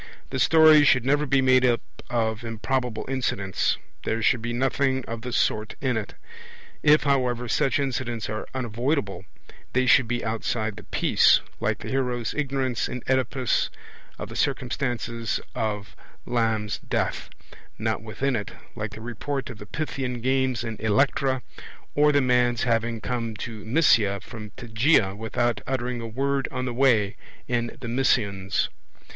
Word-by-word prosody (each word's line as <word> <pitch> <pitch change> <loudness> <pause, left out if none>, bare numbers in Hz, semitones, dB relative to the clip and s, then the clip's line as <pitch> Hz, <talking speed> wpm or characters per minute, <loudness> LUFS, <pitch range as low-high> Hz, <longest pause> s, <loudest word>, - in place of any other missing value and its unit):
The - - -2
story 155 -2 +7
should 125 -4 +4
never 145 +2 +2
be 135 0 +3
made 130 0 +5
up 120 -2 +3 0.3
of 115 -1 -1
improbable 120 +1 -2
incidents; 110 -8 0 0.3
there 110 0 -1
should 120 0 +3
be 120 +1 -3
nothing 130 +1 0
of 115 0 -5
the 125 +1 -5
sort 110 -2 0
in 130 -3 0
it. 110 -3 -4 0.7
If, 150 +1 +5
however, 125 -4 +1
such 130 +3 +2
incidents 125 -5 -2
are 110 0 -4
unavoidable, 120 - -1 0.5
they 130 0 +2
should 130 -1 +5
be 120 +1 -2
outside 110 -1 -2
the - - -11
piece, - - +4 0.2
like - - 0
the - - -9
hero's 125 -3 -1
ignorance 135 -5 -1
in 125 - -5
Oedipus 130 -1 +1 0.5
of - - -6
the - - -9
circumstances 120 -4 -1
of 105 -2 -3 0.3
Lams' 110 -3 0
death; - - -2 0.5
not - - -1
within 135 -1 -2
it, 105 -3 -4 0.2
like 105 0 -4
the 110 - -9
report 120 +3 -4
of 105 - -11
the 105 - -10
Pythian 130 -2 -3
games 130 -1 +1
in 115 -2 -5
Electra, 130 +4 +1 0.5
or 150 0 +4
the 145 -1 +3
man's 125 -2 +2
having 115 -1 0
come 115 -3 -3
to 110 0 -7
Mysia 110 -6 +3
from 110 -2 -9
Tegea 110 -3 +2
without 115 +2 -1
uttering 125 -2 -2
a 115 - -5
word 135 +4 -1
on 130 -1 -3
the 125 - -3
way, 115 -6 +3 0.3
in 120 -1 -2
The 125 - -6
Mysians. 100 -6 +1
120 Hz, 150 wpm, -25 LUFS, 110-130 Hz, 0.7 s, story